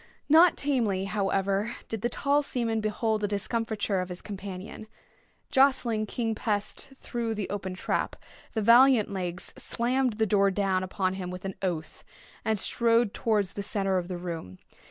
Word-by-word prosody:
Not 325 +4 +6
tamely, 230 -9 0
however, 195 +1 0
did 225 -3 -4
the 240 - 0
tall 280 +4 +2
seaman 230 -5 -1
behold 215 0 0
the 205 - +1
discomfiture 210 -1 -1
of 185 - -5
his 180 0 -8
companion. 195 +1 -7 0.6
Jostling 260 -5 +3
King 225 +1 -1
Pest 215 +5 -3
through 230 -2 -3
the 205 -2 -3
open 190 -2 -4
trap, 185 - -1 0.4
the 220 - -1
valiant 240 0 +6
Legs 180 -2 -4
slammed 250 +1 0
the 220 +1 +1
door 200 -1 +3
down 195 -1 +1
upon 185 0 -1
him 185 -2 -5
with 180 +1 -7
an 195 - -3
oath, 170 -5 -3 0.4
and 220 -1 +1
strode 230 +1 +2
towards 210 -4 0
the 200 - -4
centre 195 -2 +1
of 175 - -6
the 180 -1 -4
room. 165 - -6
210 Hz, 160 wpm, -28 LUFS, 190-230 Hz, 0.6 s, Not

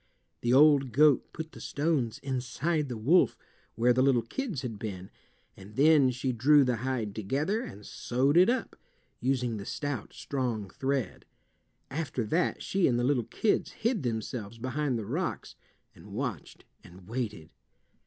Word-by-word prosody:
The 120 - 0
old 140 -2 +5
goat 150 +1 +4
put 160 0 -7
the - - -12
stones 145 -6 -1
inside 140 +4 -1
the 120 - -4
wolf, 150 +12 +3 0.4
where 120 +2 +4
the 130 - +2
little 130 -3 +3
kids 185 - -4
had 115 -5 -5
been, 95 -4 -6 0.4
and 100 +2 -13
then 145 -1 +5
she 125 +1 -2
drew 140 +5 +5
the 125 -2 0
hide 120 -3 -2
together 145 - -1
and 105 - -9
sewed 130 +5 0
it 180 +4 +6
up, 255 +2 -1 0.4
using 125 -3 0
the 100 - -6
stout, 145 -7 -4
strong 120 -8 -3
thread. 135 -2 -2 0.7
After 135 -5 -2
that 165 +11 0
she 195 -2 +2
and 120 - +2
the 120 - 0
little 125 -3 +1
kids 205 - 0
hid 230 -3 -1
themselves 115 -2 -4
behind 130 +2 -1
the 110 - -4
rocks, 160 - -3 0.4
and - - -14
watched - - -5 0.2
and 90 +1 -15
waited. 110 -8 -4
130 Hz, 155 wpm, -29 LUFS, 115-150 Hz, 0.7 s, it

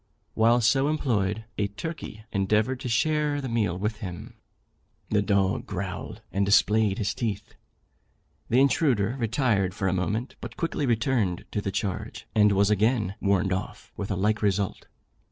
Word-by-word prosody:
While 115 +2 +4
so 135 +5 +3
employed, 110 -8 0
a 100 - +2
turkey 110 -1 -7
endeavoured 105 +5 +1
to 125 - -4
share 150 +4 +1
the 135 - -4
meal 105 -7 0
with 105 +3 -2
him. 90 -6 -7 0.8
The 105 - +3
dog 100 -2 +1
growled, - - -5
and 100 - +1
displayed 105 0 +3
his 100 - -1
teeth. 115 -6 -4 1.0
The 125 - +4
intruder 130 -6 +2
retired 110 -6 +1
for 95 - -1
a 95 - +1
moment, 105 +7 -2
but - - -8
quickly 160 -4 -1
returned 115 -6 0
to 105 - -1
the 100 - -3
charge, 95 -1 -4
and 105 -1 +5
was 100 +1 +3
again 105 -1 +2
"warned 95 -1 +2
off," 95 - -6
with 100 - -5
a 100 - 0
like 105 +3 +1
result. 100 -1 -1
105 Hz, 155 wpm, -26 LUFS, 100-120 Hz, 1.0 s, and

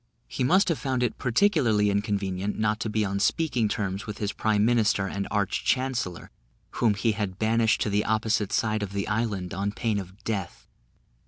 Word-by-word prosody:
He - - -3
must 185 +10 +4
have 165 - 0
found 130 -3 -1
it 120 - -2
particularly 120 - +3
inconvenient 100 -1 -1
not 110 0 0
to 110 - -2
be 105 0 0
on 100 0 -2
speaking 125 +1 +1
terms 100 -2 -3
with 105 - -5
his 105 -1 -2
prime 105 -1 +1
minister 110 -4 +2
and 100 +1 -3
arch 100 -2 -1
chancellor, 125 -9 -1 0.5
whom 110 -4 +4
he 115 +2 +1
had 100 -3 -3
banished 110 +1 +2
to - - +1
the 105 +1 +2
opposite 110 -2 0
side 110 -1 0
of 100 -1 -4
the 100 -1 -2
island 110 -5 -2
on 100 +3 -1
pain 105 -1 -1
of 95 +1 -10
death. 100 -5 -4
105 Hz, 185 wpm, -26 LUFS, 100-115 Hz, 0.5 s, must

